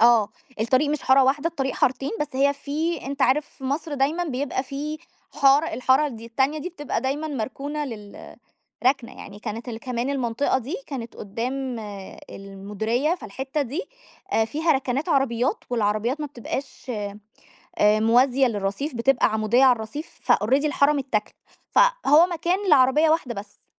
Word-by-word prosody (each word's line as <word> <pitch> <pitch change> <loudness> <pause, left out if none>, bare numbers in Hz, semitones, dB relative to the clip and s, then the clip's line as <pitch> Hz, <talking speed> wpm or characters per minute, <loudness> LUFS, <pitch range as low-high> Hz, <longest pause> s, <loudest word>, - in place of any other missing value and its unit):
آه، 230 -3 +5 0.3
الطريق 260 +6 +2
مش 300 - -2
حارة 265 +1 +5
واحدة، 285 +5 +2
الطريق 270 -5 -3
حارتين، 265 +2 0
بس 300 - +1
هي 280 +1 +4
في 300 +3 -3
أنت 280 0 -2
عارف 280 +3 +2
في 270 - -14
مصر 290 +3 -2
دايمًا 295 +6 +1
بيبقى 265 -2 -2
في 295 +3 -5 0.4
حارة، 280 +3 +5
الحارة 260 +4 +3
ال 255 - -6
دي 230 +1 -10
التانية 265 +6 0
دي 340 +4 -4
بتبقى 295 -8 -3
دايمًا 275 +5 -2
مركونة 285 +4 -4
لل 210 -6 -9 0.5
رَكنَة 255 -2 +2
يعني، 205 +1 -10
كانت 225 +3 -6
ال 225 -1 -5
كمان 250 +2 -2
المنطقة 260 0 0
دي 270 - -5
كانت 240 -5 -6
قدّام 245 +4 -4 0.5
المديرية، 210 - -2
فالحتة 265 - -4
دي 285 - -3 0.5
آآ 225 - +3
فيها 310 +8 +1
رَكَنَات 270 +3 -1
عربيات 265 - +1
والعربيات 230 +5 0
ما 295 - -2
بتبقاش 270 0 -6 0.9
آآ 210 +1 +4
موازية 250 +4 +4
للرصيف 210 +6 -2
بتبقى 245 +2 +3
عمودية 220 +4 +3
عالرصيف 255 +6 0
فalready 260 +8 +2
الحارة 290 -1 +3
متّاكلة، 265 -7 -2 0.4
فهو 430 - +5
مكان 365 +4 -1
لعربية 295 +3 +5
واحدة 270 -7 0
بس. 200 +1 -10
265 Hz, 150 wpm, -24 LUFS, 235-295 Hz, 0.9 s, آه